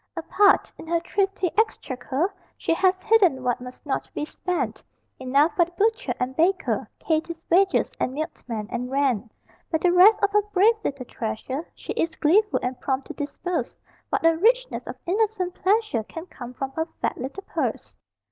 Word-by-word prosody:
Apart, 390 +5 +3
in - - -9
her 335 +1 +2
thrifty 385 +1 0
exchequer, 330 - 0 0.2
She - - 0
has 370 +2 +2
hidden 375 -13 +4
what 245 0 0
must 250 +3 -10
not 275 - -2
be 300 - -2
spent: 360 +3 -3 0.4
Enough 275 +5 +2
for 345 - +4
the 345 - -17
butcher 450 +6 +1
and 255 +1 -2
baker, 360 +5 +1
Katie's 325 +1 -1
wages, 380 +2 +3
and - - 0
milkman, 250 -8 -5
and 250 +1 -3
rent; 255 -5 0 0.4
But 320 -1 0
the 360 - +4
rest 375 +5 +7
of 405 - +3
her 420 0 +4
brave 415 +2 +4
little 275 -7 -3
treasure 255 +7 -4
She - - -6
is 325 -1 -1
gleeful 410 +8 +3
and 250 0 -3
prompt 265 0 -1
to - - -4
disburse 335 +4 -3 0.3
What - - 0
a 330 0 +6
richness - - +1
of - - -6
innocent 385 -1 0
pleasure 405 - +1
Can 325 +10 -8
come 250 -8 -10
from 270 +1 -4
her 320 +4 -2
fat - - -2
little 275 +10 -6
purse! - - -3
330 Hz, 175 wpm, -24 LUFS, 265-390 Hz, 0.4 s, rest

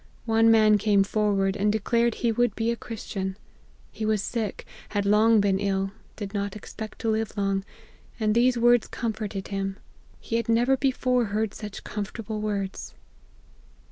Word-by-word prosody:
One 225 0 +4
man 215 -2 +6
came 200 -1 +4
forward, 200 -2 +1
and 205 +1 +2
declared 230 +2 +1
he 235 - 0
would 240 -1 +1
be 225 +1 0
a - - -1
Christian. 200 -4 -5 0.5
He 220 - -6
was 215 -2 +1
sick, 225 -4 -3 0.2
had 205 -1 -1
long 215 +2 +5
been 195 -1 +2
ill, 195 -1 0 0.2
did 205 -1 -6
not 200 -1 -2
expect 215 +1 -8
to 225 - +1
live 220 -1 -2
long, 195 -1 0 0.6
and 215 -1 +2
these 245 +2 +3
words 240 0 +4
comforted 215 -4 -4
him. 195 -1 -3 0.4
He 230 - -2
had 230 -1 -3
never 240 +4 +4
before 255 -2 +1
heard 210 0 -1
such 210 -2 -8
comfortable 215 +1 -5
words. 200 -2 -3
215 Hz, 160 wpm, -26 LUFS, 200-230 Hz, 0.6 s, man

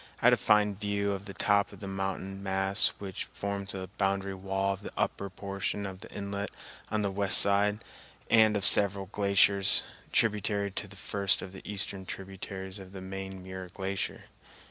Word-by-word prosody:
I - - -3
had - - +8
a - - +5
fine 105 -1 +3
view 100 0 -1
of 100 0 -4
the 100 - -8
top 100 -1 +2
of - - -12
the 100 - -7
mountain 95 0 -3
mass 95 0 +3
which 95 -3 -5
forms 100 0 -4
the 95 -1 -5
boundary 95 0 +1
wall 95 +1 -1
of 95 - -9
the - - -6
upper 100 - -1
portion 100 +2 -3
of 95 -1 -6
the - - -11
inlet 100 0 -4 0.4
on 110 0 0
the 100 - 0
west 100 0 +5
side, 100 +1 +3 0.4
and 110 -2 +5
of 100 - 0
several 100 -1 +5
glaciers, 100 0 +4 0.3
tributary 105 -2 +1
to 100 - -3
the 100 - -11
first 100 0 0
of 95 - -7
the 95 - -10
eastern 100 -2 -2
tributaries 95 0 -6
of 95 0 -11
the 95 - -7
main 95 0 -6
Muir 95 0 -7
Glacier. 95 +1 -3
100 Hz, 185 wpm, -30 LUFS, 95-100 Hz, 0.4 s, had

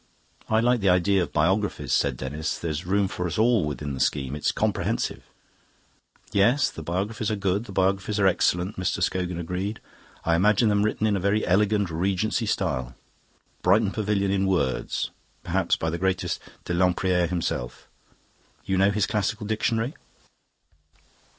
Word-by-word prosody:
"I 110 +1 +3
like 120 +1 +3
the 100 -2 +2
idea 90 +2 +3
of 85 - -1
the - - -24
Biographies," 95 +7 +1
said 70 -3 +1
Denis. 75 +5 -3
"There's 80 +1 -4
room 100 +1 +2
for 90 -1 -3
us 85 - -4
all 110 -5 +3
within 75 -1 -4
the 65 - -5
scheme; 70 -1 0
it's 75 - 0
comprehensive." - - -1 1.1
"Yes, 120 +8 +3
the - - -8
Biographies 100 +7 -2
are 110 - 0
good, 100 +2 -1
the 105 - -9
Biographies 95 +2 0
are 100 - +3
excellent," 90 +1 +1
Mr 90 - -1
Scogan 90 -2 -1
agreed. 90 +5 -3 0.5
"I 85 - +2
imagine 105 +4 +3
them 100 -1 +2
written 110 +1 0
in 105 -2 +2
a - - 0
very 100 +3 +1
elegant 100 0 +2
Regency 95 +7 0
style 65 -10 -1 0.7
Brighton 100 +2 +3
Pavilion 100 -2 0
in 95 0 +1
words 90 -9 -1 0.3
perhaps - - +1
by 80 - -2
the 85 - -3
great 95 +1 +1
Dr. 90 - -6
Lempriere 90 0 +2
himself. 80 -8 -3 0.8
You 95 -1 0
know 100 +1 +5
his 100 -1 +1
classical 105 0 -1
dictionary? 115 +4 0
95 Hz, 160 wpm, -25 LUFS, 85-105 Hz, 1.1 s, know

